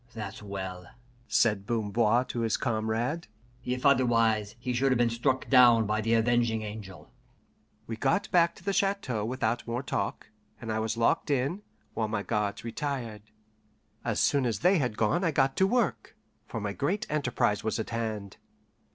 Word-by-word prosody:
"That's 110 -2 -6
well," 95 -3 -6 0.4
said 105 -4 +2
Bamboir 115 +2 +1
to 120 - -3
his 115 -2 +1
comrade. 115 +6 -1 0.4
"If 125 +2 -3
otherwise, 115 -5 +3
he 125 +1 -3
should 135 +2 +2
have 130 - +3
been 120 -1 +2
struck 125 +3 0
down 120 -4 +6
by 105 +1 0
the 115 +2 +2
Avenging 115 -1 +2
Angel." 105 -3 -9 0.7
We 115 - -5
got 135 - +1
back 170 -2 +4
to - - -16
the 200 +1 -1
chateau 195 - 0
without 120 0 -2
more 120 +3 -2
talk, 100 -3 -3 0.3
and 115 -3 -5
I 110 - -1
was 110 +1 -2
locked 115 +5 +1
in, 140 +8 0 0.3
while 110 - -1
my 105 -2 -2
guards 105 +1 -2
retired. 115 -3 -4 0.8
As 115 -3 -1
soon 140 -3 +2
as 115 - -2
they 180 +1 +4
had 125 -6 -1
gone 145 - +1
I 170 - +3
got 135 -3 +1
to 190 - +4
work, 235 -4 -1 0.3
for - - -5
my 100 -1 -3
great 165 - -1
enterprise 125 -8 0
was 110 +1 -1
at 110 - -4
hand. 110 -4 -4
115 Hz, 170 wpm, -28 LUFS, 110-135 Hz, 0.8 s, down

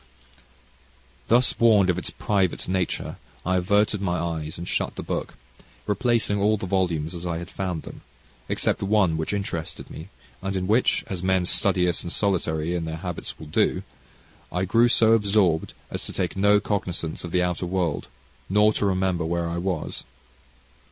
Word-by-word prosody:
Thus 120 +2 +4
warned 105 -5 +5
of 90 - -2
its - - -4
private 95 -4 0
nature, 95 -1 -2 0.3
I 90 +1 +2
averted 100 +3 +2
my 90 -2 0
eyes, 80 -2 -3
and 85 +1 -6
shut - - -1
the - - -5
book, - - -3 0.5
replacing 105 0 +1
all 105 +2 +3
the 95 - -5
volumes 90 -4 0
as 85 -1 -6
I 85 -2 -2
had 85 +3 -7
found 90 -4 -3
them, - - -10 0.5
except - - +1
one 100 -4 +3
which 80 0 -2
interested 95 -6 -4
me, 80 +5 -9 0.3
and 95 0 -3
in 95 -1 -1
which, 110 +6 +2
as 95 -3 -5
men 95 -1 +2
studious 90 -1 +1
and 85 - -6
solitary 85 -4 0
in 85 -2 -2
their 80 0 -4
habits 90 0 -6
will - - -9
do, 75 - +1 0.7
I 90 +1 0
grew 115 +6 +4
so 115 -1 +4
absorbed 100 -7 +2 0.2
as - - -3
to - - -7
take - - -2
no 100 +1 +5
cognisance 90 -6 -2
of 85 - -5
the 90 0 +2
outer 90 0 -1
world, 90 -4 -1 0.4
nor 105 +2 +4
to 105 - 0
remember 95 -2 +1
where 85 +1 -1
I 85 +1 -2
was. 90 -3 -3
95 Hz, 170 wpm, -25 LUFS, 85-100 Hz, 0.7 s, warned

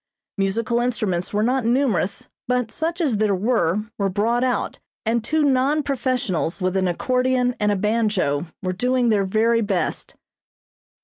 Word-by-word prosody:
Musical 225 +5 +1
instruments 215 -8 -1
were 210 +1 +1
not 255 +2 +1
numerous, 230 -5 0 0.2
but 250 -2 0
such 330 +5 -2
as 270 -10 +1
there 205 -2 +2
were, 210 -2 +1 0.2
were 200 -1 +1
brought 225 +6 +1
out, 255 -1 -1 0.3
and 225 0 +1
two 310 +5 +1
non 280 +2 +2
professionals 245 - -1
with 185 0 -1
an 190 -1 +2
accordion 250 +6 +1
and 210 0 +2
a - - +1
banjo, 205 -7 0 0.2
were 185 0 -1
doing 250 +4 +1
their 205 -3 +2
very 225 +4 +2
best. 200 -4 -2
225 Hz, 150 wpm, -22 LUFS, 195-250 Hz, 0.3 s, there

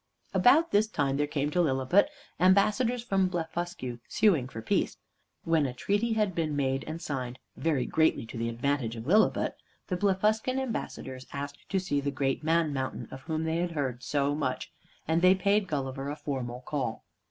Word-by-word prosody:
About 315 +7 +5
this 210 +2 +4
time 140 -9 0
there 145 0 +1
came 145 0 -1
to 180 - +2
Lilliput 150 - +3 0.3
ambassadors 210 +6 +3
from 195 -5 +2
Blefuscu, 165 -7 -4
suing 170 - +3
for 115 - -8
peace. 110 - 0 0.5
When 160 -4 +2
a 125 - -6
treaty 205 - 0
had 210 -3 +1
been 160 -3 -1
made 135 -1 0
and 160 +1 -5
signed 130 -5 -4 0.2
(very 150 -6 0
greatly 160 -7 +2
to 115 - -10
the 115 0 -1
advantage 120 0 -1
of 115 0 -7
Lilliput), 210 +9 +3 0.3
the 180 - 0
Blefuscan 210 +6 +1
ambassadors 175 - -4
asked 145 0 -6
to 195 - +1
see 155 -6 -1
the 140 - -1
Great 135 +1 -1
Man 160 -1 +2
Mountain, 130 -1 -3
of 135 - -8
whom 155 +3 -2
they 160 0 0
had 175 0 -1
heard 130 -5 -2
so 140 +3 0
much, 140 -4 -2 0.4
and 160 +2 +2
they 185 +1 +6
paid 200 +2 +2
Gulliver 135 -2 -3
a 145 - -3
formal 125 -5 -4
call. 130 -4 -3
155 Hz, 180 wpm, -29 LUFS, 135-190 Hz, 0.5 s, they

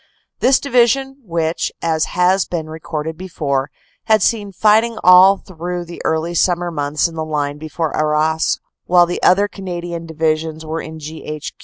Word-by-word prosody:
This 260 +1 +4
Divi 245 -4 +3
sion, 270 +2 -2
which, 165 -4 -2
as 160 -1 0
has 180 +2 +2
been 165 -3 -4
recorded 160 0 -5
before, 145 -7 -2 0.4
had 215 -3 +3
seen 205 -3 0
fighting 220 +4 +3
all 185 +2 +7
through 175 -1 -6
the 170 0 -9
early 160 +2 -1
summer 175 0 +1
months 145 0 0
in 165 - -11
the 160 -1 -3
line 145 -2 -2
before 155 +1 -3
Arras 155 +1 +1 0.3
while 175 0 +5
the 175 - -4
other 200 +3 +4
Canadian 175 -4 -6
Divisions 160 0 -2
were 160 +1 -3
in 160 0 -8
G.H. 155 -1 -7
165 Hz, 160 wpm, -18 LUFS, 155-185 Hz, 0.4 s, all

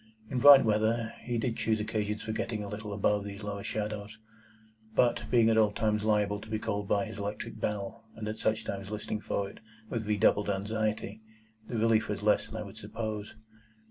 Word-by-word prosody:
In 130 - 0
bright 140 0 +9
weather, 110 +1 +1
he 120 -1 -2
did 115 0 -1
choose 110 -1 +1
occasions 105 -1 -2
for 110 - -3
getting 110 -1 -2
a - - -5
little 105 +1 -6
above 105 0 +1
these 100 +1 -7
lower 100 -1 -4
shadows; 105 0 -4 0.8
but, 120 -1 +2
being 115 -2 +5
at 110 0 +4
all 105 -1 +4
times 105 0 0
liable 105 -1 +1
to 110 - -11
be 110 - 0
called 105 -2 -2
by 100 +2 +2
his 110 -1 -8
electric 105 +2 -5
bell, 105 +2 -3
and 110 -1 -5
at 110 +1 -3
such 110 +1 0
times 100 0 -5
listening 105 0 -3
for 100 -1 -2
it - - -12 0.3
with 110 -3 -2
redoubled 105 0 +3
anxiety, 105 +1 -2 0.5
the 120 - -3
relief 110 0 +3
was 105 0 -3
less 105 0 +3
than - - -10
I 110 - -3
would 100 -1 -11
suppose. 105 0 -5
105 Hz, 200 wpm, -30 LUFS, 105-110 Hz, 0.8 s, bright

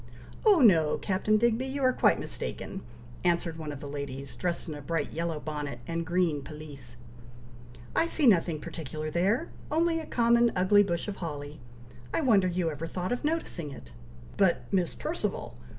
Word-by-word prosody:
"Oh 395 -7 +7
no, 165 -10 +5
Captain 205 +2 +1
Digby, 235 +3 +2
you 275 +1 -3
are 255 0 +4
quite - - +4
mistaken," 195 - -4 0.4
answered 170 -2 +1
one 155 -2 -4
of 145 - -7
the 145 - -7
ladies, 140 -1 -6
dressed 175 -1 -2
in 155 - -4
a 145 - -7
bright 165 +4 -2
yellow 165 -1 -2
bonnet 150 -4 -4
and 165 +4 -3
green 175 -4 +1
pelisse. 140 -4 -10 1.0
"I 330 - +3
see 320 -3 +1
nothing 170 -8 +4
particular 155 0 -5
there! 200 - +1 0.2
only 330 +2 +2
a 320 - -7
common 235 -1 +3
ugly 190 +3 +5
bush 175 -2 -1
of 205 - -4
holly! 150 -3 -6 0.6
I - - +2
wonder 210 -9 +4
you 175 -2 0
ever 155 +2 -5
thought 180 +2 -3
of 245 - -1
noticing 295 - -2
it!" 65 - -11 0.5
"But, 190 -3 +3
Miss 180 -3 +1
Perceval! 330 +3 -3
175 Hz, 170 wpm, -29 LUFS, 150-225 Hz, 1.0 s, Oh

